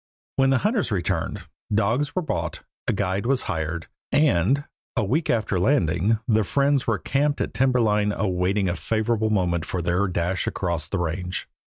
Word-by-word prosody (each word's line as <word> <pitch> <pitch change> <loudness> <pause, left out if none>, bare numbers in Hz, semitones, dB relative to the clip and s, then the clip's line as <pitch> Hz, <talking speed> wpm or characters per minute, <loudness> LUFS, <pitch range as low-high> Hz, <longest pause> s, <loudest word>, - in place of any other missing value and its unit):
When 135 0 +4
the 135 - +4
hunters 210 - +1
returned, 90 -5 -1 0.3
dogs 115 +7 +1
were 185 - 0
bought, 85 - -3 0.2
a - - +3
guide 100 +2 -1
was 135 -1 +2
hired, 80 -3 -3 0.3
and, 140 - +3 0.3
a 115 - +1
week 145 - 0
after 110 -5 +1
landing, 90 - +2
the 110 -2 +3
friends 140 +5 +1
were 115 -3 +2
camped 145 +8 0
at - - -2
timber 125 +1 +3
line 105 -2 +2
awaiting 95 0 0
a 90 - 0
favorable 110 +1 0
moment 90 -5 +1
for 90 - -3
their 90 +4 +1
dash 90 +1 -1
across 85 -4 -2
the - - -1
range. 90 +2 -3
105 Hz, 170 wpm, -24 LUFS, 90-125 Hz, 0.3 s, When